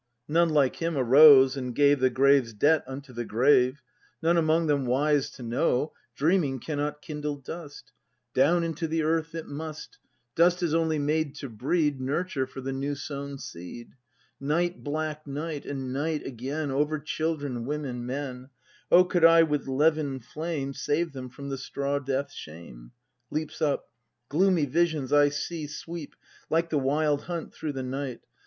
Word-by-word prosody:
None, 170 +2 +3
like 145 -4 +2
him, 165 -2 -2
arose, 135 +1 +8
and 125 -3 -4
gave 145 -1 +4
The 130 0 +4
grave's 135 -2 +3
debt 150 +9 +3
unto 135 0 -8
the 120 0 -3
grave; 130 +3 +3 0.4
None 170 +1 +3
among 165 0 +3
them 140 -4 +1
wise 145 +3 +2
to 125 - -10
know: 125 +4 0 0.2
"Dreaming 150 -3 +2
cannot 150 +1 -3
kindle 150 -1 -4
dust, 145 0 -9 0.4
Down 165 +6 +3
into 165 0 -2
the 160 0 0
earth 160 +1 0
it 165 - -5
must, 155 +1 -8 0.3
Dust 175 +2 +3
is 165 -3 0
only 160 -1 +1
made 150 0 0
to 140 -2 -7
breed 140 +4 0
Nurture 140 0 -1
for 135 - -9
the 135 +1 -3
new 140 +2 -2
sown 140 0 -6
seed." 90 +2 -9 0.5
Night, 170 +6 -1
black 155 0 -3
night,— 150 +1 -5
and 135 -2 -4
night 150 +2 -2
again 135 +4 -4
Over 150 +3 +1
children, 145 -4 -3
women, 135 -3 -4
men! 130 0 -5 0.4
O 180 - +8
could 175 -1 0
I 165 0 +8
with 150 -3 -1
levin 145 0 +1
flame 150 +1 -4
Save 155 +3 -1
them 130 -2 -7
from 140 +3 -8
the 135 -1 -4
straw 140 +1 -2
death's 140 +1 -2
shame! 75 -7 -11 0.4
[Leaps 155 +1 -4
up.] 145 -3 0 0.4
Gloomy 175 0 +3
visions 155 -2 0
I 145 0 +6
see 150 +2 -4
sweep 165 +1 -8 0.3
Like 165 +1 +1
the 150 - +2
Wild 145 +2 +1
Hunt 170 -2 -5
through 155 -2 -4
the 135 -1 -4
night. 130 -1 -4
145 Hz, 160 wpm, -27 LUFS, 135-160 Hz, 0.5 s, arose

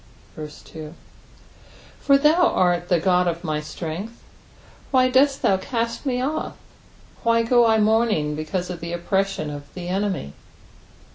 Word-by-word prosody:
2 155 +1 -9 1.0
For 275 -1 +4
thou 315 +5 +4
art 175 -1 +1
the 175 - +3
God 180 +1 +2
of 170 0 -2
my 155 -3 -1
strength: 170 +8 -6 0.7
why 255 -1 +3
dost 275 +2 +3
thou 190 - +4
cast 230 +5 -3
me 250 -1 0
off? 285 +5 -3 0.6
why 230 0 +3
go 240 0 +4
I 220 -1 +4
mourning 215 -8 +2
because 175 +4 -3
of 175 - -6
the 170 0 -5
oppression 190 -3 -1
of 145 0 -9
the 175 -1 -6
enemy 190 - -2
190 Hz, 140 wpm, -23 LUFS, 170-235 Hz, 1.0 s, For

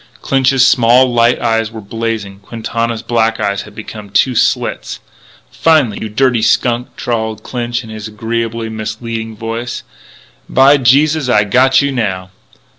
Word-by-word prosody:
Clinch's 135 -1 +3
small, 125 0 +4
light 120 +1 +3
eyes 115 -2 0
were 110 0 -9
blazing; 110 -2 -4
Quintana's 115 +2 -4
black 115 -1 0
eyes 100 -1 -1
had 105 0 -13
become 105 -1 -9
two 100 +6 +2
slits. 115 - -1 0.5
Finally: 150 -10 +2
"You 110 - -4
dirty 125 +1 +1
skunk," 120 +1 0
drawled 110 -2 -3
Clinch 120 -1 -3
in 110 - -11
his 110 0 -7
agreeably 115 +1 -3
misleading 110 0 -5
voice, 115 +2 -5 0.7
"by 135 +2 +5
Jesus 140 +3 +3
Christ 105 -4 +4
I - - +1
got 130 +6 +3
you 140 - 0
now." 95 -7 -3
115 Hz, 145 wpm, -14 LUFS, 110-125 Hz, 0.7 s, by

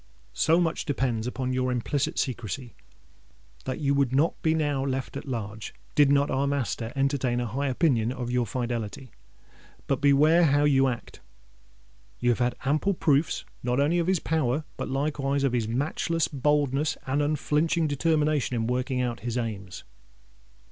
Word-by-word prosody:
So 165 +2 +3
much 170 -2 0
depends 125 -5 -1
upon 130 0 -2
your 130 0 0
implicit 130 +3 -1
secrecy, 120 0 -3 0.9
that 130 +2 -3
you 140 -2 +1
would 140 -3 +2
not 155 +5 +1
be 160 0 +2
now 145 -4 0
left 135 -1 -3
at - - -6
large, 110 -4 -5 0.2
did 145 -2 +5
not 140 0 +3
our 135 +1 +1
master 130 -4 -2
entertain 135 -3 0
a 120 - -1
high 135 +5 -2
opinion 125 -4 +1
of 125 -2 -4
your 125 -1 +1
fidelity. 120 +1 -4 0.7
But 135 -1 -1
beware 150 +4 +5
how 145 -1 +3
you 135 -2 +4
act! 120 -2 -5 1.0
You 120 0 +3
have 120 - -1
had 120 0 +1
ample 155 +8 +1
proofs 150 -1 +1 0.2
not 125 +1 0
only 155 +5 +2
of 170 - 0
his 190 -2 +2
power, 155 -3 0
but - - -5
likewise 140 0 -1
of 135 -3 +1
his 115 -3 0
matchless 145 +6 0
boldness 145 0 +1
and 135 +2 0
unflinching 150 +2 +1
determination 150 -2 +1
in 115 -1 0
working 125 +2 -1
out 120 -3 -2
his 120 +3 -3
aims." 105 -6 -5
135 Hz, 160 wpm, -27 LUFS, 125-150 Hz, 1.0 s, did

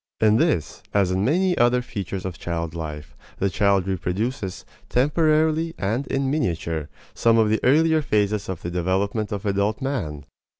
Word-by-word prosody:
In 110 0 +4
this, 155 - 0
as 95 -3 +3
in 95 +1 0
many 180 - +2
other 120 +1 +3
features 95 -5 -5
of 90 -3 -5
child 85 -2 -3
life, 75 -3 -7 0.2
the 100 0 0
child 100 0 +2
reproduces, 95 +3 -3 0.2
temporarily 155 +4 +2
and 115 +8 -1
in 135 0 0
miniature, 85 - -2 0.2
some 115 -1 +3
of 110 -1 +4
the 110 - +2
earlier 160 +4 +4
phases 105 -6 0
of 95 -4 -5
the 85 - -3
development 95 +4 -1
of 100 0 -4
adult 100 +1 0
man. 95 - -3
105 Hz, 160 wpm, -23 LUFS, 90-135 Hz, 0.2 s, In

